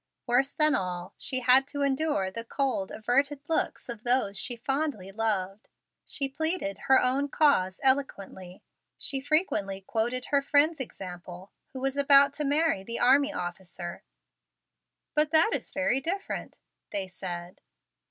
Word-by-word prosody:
Worse 265 Hz, +3 st, +2 dB
than 305 Hz, -1 st, +3 dB
all, 180 Hz, 0 st, -3 dB
she 260 Hz, -1 st, -2 dB
had 260 Hz, +2 st, +5 dB
to 285 Hz, -1 st, -3 dB
endure 270 Hz, -8 st, 0 dB
the 230 Hz, +4 st, -6 dB
cold, 250 Hz, -5 st, -1 dB
averted 275 Hz, +6 st, 0 dB
looks 325 Hz, -, -1 dB
of 235 Hz, -3 st, -7 dB
those 240 Hz, -5 st, +1 dB
she 240 Hz, +6 st, -1 dB
fondly 270 Hz, -5 st, -2 dB
loved. 200 Hz, -2 st, -2 dB, 0.4 s
She 275 Hz, -, -1 dB
pleaded 315 Hz, -, -3 dB
her 265 Hz, -, +7 dB
own 270 Hz, +3 st, +1 dB
cause 190 Hz, -13 st, +2 dB
eloquently. 200 Hz, -9 st, 0 dB, 0.3 s
She 270 Hz, -1 st, +1 dB
frequently 265 Hz, -, 0 dB
quoted 240 Hz, +5 st, -2 dB
her 280 Hz, -1 st, +4 dB
friend's 295 Hz, +3 st, +2 dB
example, 180 Hz, -5 st, -8 dB, 0.2 s
who 260 Hz, -, -6 dB
was 270 Hz, +1 st, -1 dB
about 280 Hz, 0 st, +6 dB
to -, -, 0 dB
marry 290 Hz, -7 st, +1 dB
the 230 Hz, +4 st, -5 dB
army 280 Hz, +4 st, +4 dB
officer. 175 Hz, -, -6 dB, 1.1 s
"But 300 Hz, 0 st, +2 dB
that 320 Hz, +7 st, +4 dB
is -, -, -2 dB
very 280 Hz, -2 st, 0 dB
different," 390 Hz, +7 st, -4 dB, 0.3 s
they 195 Hz, -2 st, -3 dB
said. 180 Hz, -1 st, -7 dB
255 Hz, 140 wpm, -28 LUFS, 195-285 Hz, 1.1 s, her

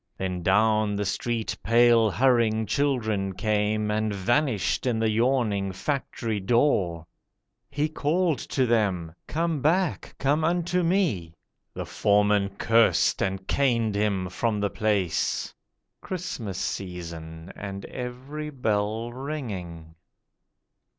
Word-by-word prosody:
Then 90 Hz, -1 st, -3 dB
down 105 Hz, +3 st, +3 dB
the 105 Hz, 0 st, -1 dB
street 115 Hz, +3 st, -2 dB
pale 115 Hz, 0 st, +5 dB
hurrying 115 Hz, -2 st, +2 dB
children 110 Hz, -6 st, 0 dB
came, 105 Hz, +1 st, 0 dB
And 110 Hz, 0 st, 0 dB
vanished 120 Hz, +4 st, 0 dB
in 120 Hz, -3 st, +1 dB
the 110 Hz, 0 st, +1 dB
yawning 110 Hz, -4 st, +1 dB
Factory 115 Hz, -1 st, -3 dB
door. 95 Hz, -, +1 dB, 0.6 s
He 145 Hz, +2 st, 0 dB
called 155 Hz, +1 st, 0 dB
to 130 Hz, -, +1 dB
them: 100 Hz, -9 st, 0 dB
'Come 165 Hz, -2 st, -1 dB
back, 170 Hz, +4 st, 0 dB
come 145 Hz, +3 st, +1 dB
unto 175 Hz, +2 st, +1 dB
Me.' 165 Hz, -, 0 dB, 0.4 s
The -, -, -4 dB
Foreman 105 Hz, -1 st, +2 dB
cursed, 115 Hz, 0 st, +3 dB
and 95 Hz, 0 st, -2 dB
caned 115 Hz, -6 st, +1 dB
Him 100 Hz, -3 st, 0 dB
from 105 Hz, +3 st, -1 dB
the 100 Hz, -1 st, 0 dB
place. 105 Hz, -5 st, 0 dB, 0.5 s
(Christmas 125 Hz, -, -5 dB
season, 85 Hz, -3 st, -6 dB
and 100 Hz, -1 st, -6 dB
every 130 Hz, +5 st, -6 dB
bell 110 Hz, -3 st, -1 dB
ringing.) 100 Hz, -, -6 dB
110 Hz, 110 wpm, -26 LUFS, 100-135 Hz, 0.6 s, pale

